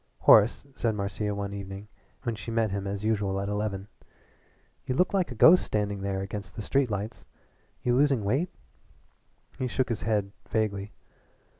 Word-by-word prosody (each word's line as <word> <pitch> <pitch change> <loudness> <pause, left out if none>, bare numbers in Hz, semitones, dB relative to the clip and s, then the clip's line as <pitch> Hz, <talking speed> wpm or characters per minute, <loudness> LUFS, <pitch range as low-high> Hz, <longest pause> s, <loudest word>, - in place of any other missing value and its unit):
"Horace," 110 +5 +6
said 115 -4 0
Marcia 105 +1 -2
one 100 0 -4
evening 100 +1 -7 0.4
when 120 - -1
she 110 - -7
met 115 -2 +1
him 100 0 -3
as 100 +1 -3
usual 100 -3 0
at 100 - -2
eleven, 105 -1 -2 1.0
"you 125 - 0
looked 180 +7 +2
like 185 -7 +1
a - - -5
ghost 165 +11 +7
standing 105 -2 -2
there 95 -1 -2
against 100 +1 -6
the 110 - -5
street 135 +3 +1
lights. 105 +1 -4 0.6
You 120 - +2
losing 135 -3 +3
weight?" 135 - +1 1.1
He 130 - 0
shook 125 +1 -1
his 115 - -2
head 105 -2 0 0.2
vaguely. 105 -2 -1
105 Hz, 165 wpm, -28 LUFS, 100-120 Hz, 1.1 s, ghost